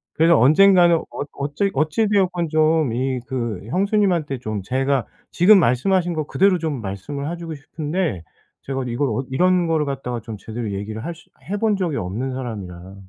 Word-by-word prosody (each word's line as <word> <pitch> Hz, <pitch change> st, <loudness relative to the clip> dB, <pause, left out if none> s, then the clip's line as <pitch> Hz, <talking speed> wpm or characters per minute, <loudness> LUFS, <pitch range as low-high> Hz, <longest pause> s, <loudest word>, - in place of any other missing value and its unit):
그래서 165 Hz, +2 st, +5 dB
언젠가는 175 Hz, +5 st, +6 dB
엇 145 Hz, -, -5 dB
어찌 145 Hz, +8 st, -2 dB
어찌 155 Hz, +10 st, +1 dB
되었건 180 Hz, -5 st, +1 dB
좀 155 Hz, -4 st, +2 dB
이 130 Hz, +1 st, -1 dB
그 120 Hz, -7 st, -3 dB
형수님한테 185 Hz, -, +1 dB
좀 110 Hz, -4 st, -4 dB
제가 135 Hz, +2 st, 0 dB, 0.2 s
지금 190 Hz, +3 st, +6 dB
말씀하신 175 Hz, +7 st, +2 dB
거 155 Hz, -, -2 dB
그대로 190 Hz, -2 st, +3 dB
좀 150 Hz, -7 st, -3 dB
말씀을 140 Hz, -, -5 dB
해 175 Hz, -, -5 dB
주고 165 Hz, -2 st, -6 dB
싶은데 150 Hz, -, -3 dB, 0.4 s
제가 135 Hz, -1 st, -3 dB
이걸 120 Hz, +3 st, -1 dB
엇 130 Hz, +5 st, -2 dB
이런 180 Hz, +4 st, +3 dB
거를 160 Hz, -2 st, +1 dB
갖다가 125 Hz, -3 st, -3 dB
좀 110 Hz, -1 st, -8 dB
제대로 110 Hz, +1 st, -5 dB
얘기를 105 Hz, +3 st, -5 dB
할 170 Hz, 0 st, -4 dB
수 175 Hz, -, -20 dB, 0.2 s
해 205 Hz, -, -1 dB
본 215 Hz, -2 st, +1 dB
적이 170 Hz, -7 st, -1 dB
없는 110 Hz, +9 st, -3 dB
사람이라 95 Hz, -7 st, -7 dB
145 Hz, 355 characters per minute, -21 LUFS, 120-175 Hz, 0.4 s, 언젠가는